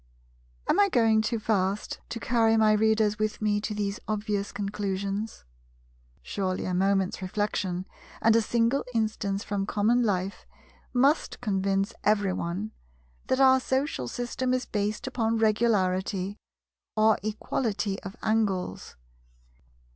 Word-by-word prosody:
Am -, -, +3 dB
I 405 Hz, -1 st, +5 dB
going 225 Hz, -, +4 dB
too 225 Hz, +2 st, -1 dB
fast 205 Hz, -2 st, -1 dB
to 230 Hz, -, -4 dB
carry 225 Hz, -1 st, +3 dB
my 215 Hz, -1 st, +5 dB
Readers 215 Hz, 0 st, +2 dB
with 215 Hz, 0 st, -1 dB
me 210 Hz, -1 st, +1 dB
to 210 Hz, 0 st, -3 dB
these 205 Hz, 0 st, -2 dB
obvious 210 Hz, -1 st, -2 dB
conclusions? 200 Hz, -, -3 dB, 0.8 s
Surely 185 Hz, -, -2 dB
a 185 Hz, -, -2 dB
moment's 195 Hz, 0 st, +1 dB
reflection, 185 Hz, -1 st, -2 dB, 0.3 s
and 225 Hz, 0 st, +4 dB
a 230 Hz, -, +5 dB
single 235 Hz, +4 st, +1 dB
instance 210 Hz, -3 st, -1 dB
from 200 Hz, -1 st, -2 dB
common 225 Hz, +4 st, +2 dB
life, 195 Hz, -3 st, -1 dB, 0.4 s
must 275 Hz, +5 st, +2 dB
convince 195 Hz, -1 st, 0 dB
every 205 Hz, -3 st, +2 dB
one 185 Hz, +5 st, -3 dB, 0.6 s
that 260 Hz, -, +1 dB
our 265 Hz, -1 st, +6 dB
social 260 Hz, -, -1 dB
system 250 Hz, -, -1 dB
is 255 Hz, -, -2 dB
based 210 Hz, 0 st, -2 dB
upon 230 Hz, -4 st, 0 dB
Regularity, 200 Hz, -3 st, +1 dB, 0.6 s
or 215 Hz, 0 st, +4 dB
Equality 215 Hz, -1 st, -2 dB
of 195 Hz, 0 st, -8 dB
Angles. 210 Hz, -, -1 dB
210 Hz, 125 wpm, -27 LUFS, 195-225 Hz, 0.8 s, our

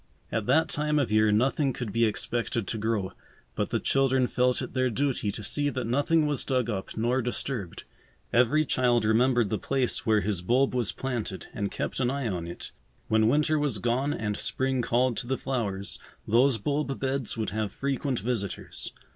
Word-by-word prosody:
At 110 Hz, -2 st, -1 dB
that 155 Hz, +6 st, +4 dB
time 150 Hz, 0 st, 0 dB
of 140 Hz, -7 st, +1 dB
year 110 Hz, 0 st, +4 dB
nothing 135 Hz, +5 st, +2 dB
could 115 Hz, -6 st, -5 dB
be 115 Hz, +2 st, +3 dB
expected 115 Hz, +1 st, -1 dB
to 110 Hz, -, -3 dB
grow, 105 Hz, -3 st, -1 dB, 0.4 s
but -, -, -2 dB
the -, -, 0 dB
children 135 Hz, -1 st, +2 dB
felt 125 Hz, 0 st, +1 dB
it -, -, -5 dB
their 130 Hz, -1 st, +2 dB
duty 130 Hz, -3 st, 0 dB
to 105 Hz, -, -5 dB
see 145 Hz, +7 st, +1 dB
that 130 Hz, -3 st, -3 dB
nothing 145 Hz, +6 st, +2 dB
was 145 Hz, -3 st, -1 dB
dug 125 Hz, -3 st, 0 dB
up 95 Hz, 0 st, -5 dB
nor 120 Hz, +4 st, +1 dB
disturbed. 120 Hz, -5 st, -4 dB, 0.5 s
Every 125 Hz, +6 st, +4 dB
child 120 Hz, -4 st, +2 dB
remembered 120 Hz, 0 st, +3 dB
the 110 Hz, -, 0 dB
place 135 Hz, -3 st, 0 dB
where 110 Hz, -2 st, +3 dB
his 100 Hz, -3 st, -1 dB
bulb 125 Hz, +8 st, +2 dB
was 120 Hz, -5 st, 0 dB
planted 120 Hz, -7 st, -4 dB
and 100 Hz, -1 st, -2 dB
kept -, -, -3 dB
an 125 Hz, -2 st, +2 dB
eye 140 Hz, -2 st, -2 dB
on 90 Hz, -5 st, -3 dB
it. 85 Hz, -, -8 dB, 0.4 s
When 110 Hz, 0 st, +4 dB
winter 150 Hz, +4 st, +3 dB
was 145 Hz, -7 st, 0 dB
gone 120 Hz, +7 st, 0 dB
and 105 Hz, -6 st, -2 dB
spring 130 Hz, -1 st, 0 dB
called 120 Hz, 0 st, +1 dB
to -, -, -3 dB
the 130 Hz, +1 st, 0 dB
flowers, 100 Hz, -7 st, -3 dB, 0.3 s
those 120 Hz, +3 st, +4 dB
bulb 140 Hz, +4 st, -2 dB
beds 135 Hz, -3 st, -2 dB
would 110 Hz, -2 st, -2 dB
have 110 Hz, -2 st, -2 dB
frequent 135 Hz, 0 st, -2 dB
visitors. 105 Hz, -4 st, -4 dB
125 Hz, 190 wpm, -27 LUFS, 110-135 Hz, 0.5 s, that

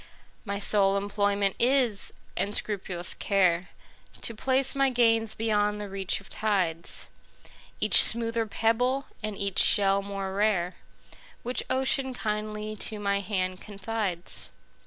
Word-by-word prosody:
My 200 Hz, -1 st, -3 dB
sole 200 Hz, -1 st, +3 dB
employment 200 Hz, -1 st, 0 dB
is, 245 Hz, -5 st, +1 dB, 0.2 s
and 205 Hz, +1 st, -1 dB
scrupulous 185 Hz, -4 st, 0 dB
care, 185 Hz, -3 st, +1 dB, 0.5 s
To 230 Hz, -, -2 dB
place 265 Hz, +4 st, 0 dB
my 275 Hz, 0 st, +2 dB
gains 225 Hz, -3 st, +2 dB
beyond 210 Hz, -2 st, 0 dB
the 205 Hz, -, -5 dB
reach 195 Hz, -1 st, -2 dB
of 200 Hz, -, -14 dB
tides,—Each 180 Hz, -6 st, 0 dB
smoother 230 Hz, -1 st, +1 dB
pebble, 245 Hz, +5 st, +1 dB, 0.2 s
and 215 Hz, -2 st, -4 dB
each 200 Hz, -1 st, -1 dB
shell 200 Hz, -2 st, +5 dB
more 195 Hz, -1 st, -5 dB
rare, 195 Hz, -3 st, 0 dB, 0.7 s
Which 245 Hz, +1 st, -1 dB
Ocean 265 Hz, 0 st, +1 dB
kindly 215 Hz, -1 st, -3 dB
to 215 Hz, +1 st, -3 dB
my 200 Hz, -1 st, 0 dB
hand 185 Hz, -2 st, -3 dB
confides. 200 Hz, -3 st, -4 dB
210 Hz, 120 wpm, -27 LUFS, 195-225 Hz, 0.7 s, shell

